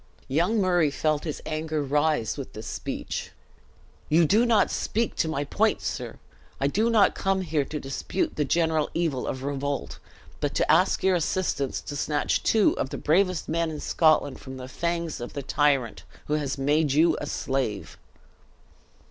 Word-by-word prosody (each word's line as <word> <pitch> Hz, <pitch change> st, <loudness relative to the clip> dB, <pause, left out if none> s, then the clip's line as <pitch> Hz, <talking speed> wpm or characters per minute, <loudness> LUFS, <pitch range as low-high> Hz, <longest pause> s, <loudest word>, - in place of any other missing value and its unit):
Young 175 Hz, +11 st, +1 dB
Murray 175 Hz, -5 st, +3 dB
felt 155 Hz, +1 st, -1 dB
his 155 Hz, -, -5 dB
anger 155 Hz, -1 st, -2 dB
rise 145 Hz, -3 st, +1 dB
with -, -, -7 dB
this -, -, -8 dB
speech. -, -, -4 dB, 0.8 s
"You 165 Hz, +2 st, +5 dB
do 220 Hz, +9 st, +3 dB
not 225 Hz, -3 st, +3 dB
speak 230 Hz, +1 st, -1 dB
to -, -, +1 dB
my 145 Hz, -3 st, -1 dB
point, 145 Hz, -, +1 dB
sir! -, -, -5 dB, 0.4 s
I 135 Hz, -, 0 dB
do 215 Hz, +11 st, +2 dB
not 220 Hz, -3 st, +4 dB
come 195 Hz, -1 st, 0 dB
here 155 Hz, -5 st, 0 dB
to 150 Hz, -, -5 dB
dispute 135 Hz, +7 st, -3 dB
the 150 Hz, -, +1 dB
general 160 Hz, 0 st, +1 dB
evil 160 Hz, -7 st, -1 dB
of 130 Hz, 0 st, -4 dB
revolt, 140 Hz, 0 st, -3 dB, 0.4 s
but -, -, -2 dB
to -, -, +2 dB
ask -, -, +3 dB
your 190 Hz, 0 st, +4 dB
assistance 165 Hz, -4 st, -1 dB
to 145 Hz, -, -7 dB
snatch 145 Hz, +1 st, 0 dB
two 220 Hz, -2 st, +3 dB
of 130 Hz, -, -1 dB
the -, -, -5 dB
bravest 180 Hz, +1 st, +1 dB
men 165 Hz, +1 st, 0 dB
in 155 Hz, -1 st, -5 dB
Scotland 155 Hz, -4 st, +2 dB
from 130 Hz, -1 st, -9 dB
the 130 Hz, 0 st, -7 dB
fangs 170 Hz, 0 st, -3 dB
of 120 Hz, -, -6 dB
the 140 Hz, -, -5 dB
tyrant 140 Hz, -4 st, +1 dB, 0.2 s
who 150 Hz, -, -2 dB
has 145 Hz, -2 st, -1 dB
made 145 Hz, +1 st, +2 dB
you 165 Hz, +3 st, +4 dB
a 145 Hz, -, -4 dB
slave!" 130 Hz, -8 st, -3 dB
155 Hz, 175 wpm, -26 LUFS, 140-170 Hz, 0.8 s, You